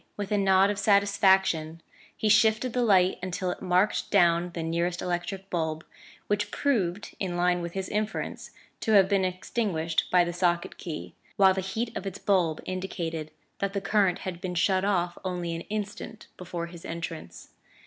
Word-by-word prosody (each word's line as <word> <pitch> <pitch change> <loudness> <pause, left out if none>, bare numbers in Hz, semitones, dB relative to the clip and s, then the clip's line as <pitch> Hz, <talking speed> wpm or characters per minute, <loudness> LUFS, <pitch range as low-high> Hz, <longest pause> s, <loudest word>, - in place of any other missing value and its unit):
With 205 0 -4
a 210 - +3
nod 195 0 +4
of 205 - -4
satisfaction, 190 -5 +3 0.4
he 220 - 0
shifted 220 +3 +4
the 250 - +1
light 190 -6 +4
until 185 0 -2
it - - -7
marked 185 +2 +1
down 175 -2 +3
the 165 - -3
nearest 170 +2 -1
electric 180 +2 -3
bulb, 160 -2 -2 0.4
which 205 0 -1
proved, 205 -9 -1
in 180 -3 -2
line 175 0 +2
with 170 0 -5
his 190 -1 -3
inference, 215 +1 -3 0.3
to 220 - 0
have 195 -2 +7
been 195 -1 +2
extinguished 185 -3 -1
by 180 -1 +5
the 175 0 -3
socket 175 -1 0
key, 160 -3 -6 0.2
while 190 -1 +6
the 190 - -2
heat 225 +5 -3
of - - -4
its 195 - -5
bulb 180 -6 +1
indicated 170 -4 -4 0.3
that 200 0 -1
the 200 - 0
current 195 -2 +2
had 180 -2 -5
been 180 -2 -4
shut 185 +2 +2
off 180 -3 0
only 175 -2 -3
an 165 - -4
instant 210 +1 -5
before 175 -2 -5
his 170 0 -11
entrance. 165 - -7
185 Hz, 175 wpm, -27 LUFS, 175-200 Hz, 0.4 s, have